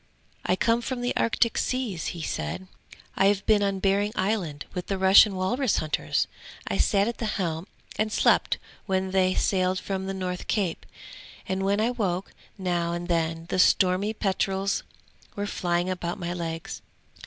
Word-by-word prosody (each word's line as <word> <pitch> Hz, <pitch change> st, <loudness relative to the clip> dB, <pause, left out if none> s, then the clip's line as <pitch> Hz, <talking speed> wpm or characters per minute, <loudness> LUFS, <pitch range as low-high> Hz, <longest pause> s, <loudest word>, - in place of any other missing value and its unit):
'I 180 Hz, -, +3 dB
come 230 Hz, +4 st, +2 dB
from 245 Hz, +1 st, -3 dB
the 245 Hz, -, -1 dB
Arctic 230 Hz, 0 st, +2 dB
seas,' 240 Hz, -10 st, -2 dB
he 170 Hz, -2 st, -4 dB
said. 190 Hz, -, -3 dB, 0.5 s
'I 195 Hz, -, +4 dB
have 200 Hz, -1 st, +1 dB
been 215 Hz, -2 st, +4 dB
on 200 Hz, -1 st, +1 dB
Behring 200 Hz, +2 st, +1 dB
Island 185 Hz, -7 st, -1 dB
with 180 Hz, 0 st, -4 dB
the 195 Hz, -, -1 dB
Russian 190 Hz, +2 st, +7 dB
walrus 230 Hz, +7 st, +1 dB
hunters. 155 Hz, -1 st, 0 dB, 0.4 s
I -, -, -1 dB
sat 200 Hz, 0 st, +3 dB
at 235 Hz, -, -4 dB
the 225 Hz, -, -1 dB
helm 170 Hz, -2 st, -2 dB, 0.3 s
and 215 Hz, 0 st, +1 dB
slept -, -, +3 dB, 0.3 s
when 190 Hz, -1 st, 0 dB
they 185 Hz, -1 st, +2 dB
sailed 185 Hz, -1 st, +1 dB
from 190 Hz, 0 st, -3 dB
the 195 Hz, -, -3 dB
north 180 Hz, -1 st, -4 dB
cape, 190 Hz, -6 st, -1 dB, 0.6 s
and 190 Hz, 0 st, -1 dB
when 200 Hz, +1 st, +2 dB
I 225 Hz, +3 st, +2 dB
woke 195 Hz, -6 st, -2 dB, 0.2 s
now 175 Hz, -3 st, -1 dB
and 175 Hz, +1 st, -4 dB
then 165 Hz, -1 st, 0 dB
the -, -, 0 dB
stormy 185 Hz, +3 st, +4 dB
petrels 195 Hz, -1 st, 0 dB, 0.5 s
were 205 Hz, -, -2 dB
flying 175 Hz, -3 st, -1 dB
about 180 Hz, -2 st, -3 dB
my 175 Hz, 0 st, -3 dB
legs. 165 Hz, -2 st, -5 dB
190 Hz, 165 wpm, -26 LUFS, 180-205 Hz, 0.6 s, Russian